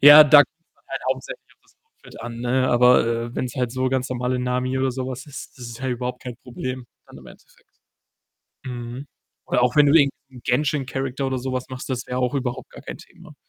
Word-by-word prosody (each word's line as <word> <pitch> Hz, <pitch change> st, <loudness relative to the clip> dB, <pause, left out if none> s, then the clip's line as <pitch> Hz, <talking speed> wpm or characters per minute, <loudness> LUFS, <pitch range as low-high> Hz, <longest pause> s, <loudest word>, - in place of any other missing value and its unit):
ja, 145 Hz, +2 st, +11 dB
da 150 Hz, 0 st, +8 dB
kommt's 160 Hz, +3 st, +1 dB
dann -, -, -35 dB
halt -, -, -4 dB
hauptsächlich -, -, -6 dB
auf -, -, -50 dB
das -, -, -29 dB
Outfit 450 Hz, -, -15 dB
an, 115 Hz, 0 st, -6 dB
ne? 130 Hz, +2 st, +1 dB
Aber, 125 Hz, -1 st, +5 dB
äh, 115 Hz, +1 st, -2 dB
wenn's 125 Hz, -2 st, -3 dB
halt 125 Hz, -2 st, -1 dB
so 130 Hz, 0 st, 0 dB
ganz 130 Hz, 0 st, -1 dB
normale 125 Hz, 0 st, -1 dB
„Nami“ 125 Hz, +1 st, -1 dB
oder 130 Hz, 0 st, +1 dB
so 130 Hz, 0 st, -4 dB
was 130 Hz, +2 st, -6 dB
ist, 140 Hz, -2 st, -9 dB
das 125 Hz, -, -7 dB
ist 115 Hz, 0 st, -8 dB
ja 130 Hz, -, -3 dB
überhaupt 125 Hz, 0 st, -3 dB
kein 125 Hz, -2 st, -7 dB
Problem 130 Hz, +1 st, -5 dB, 0.2 s
dann -, -, -13 dB
im -, -, -14 dB
Endeffekt. -, -, -18 dB, 1.0 s
Mhm. 125 Hz, +2 st, -6 dB, 0.4 s
Oder -, -, +2 dB
auch 125 Hz, 0 st, +2 dB
wenn 150 Hz, -1 st, +7 dB
du 140 Hz, -, +4 dB
irgend' 140 Hz, -4 st, +6 dB, 0.2 s
nen 130 Hz, -2 st, -13 dB
„Genshin-Character“ 135 Hz, 0 st, -1 dB
oder 130 Hz, -1 st, -1 dB
sowas 130 Hz, 0 st, -3 dB
machst, 130 Hz, 0 st, -7 dB
das 125 Hz, -2 st, -3 dB
wäre 125 Hz, -, -3 dB
auch 125 Hz, +2 st, 0 dB
überhaupt 125 Hz, -3 st, -3 dB
gar -, -, -12 dB
kein -, -, -7 dB
Thema. -, -, -15 dB
130 Hz, 220 wpm, -23 LUFS, 125-135 Hz, 1.0 s, ja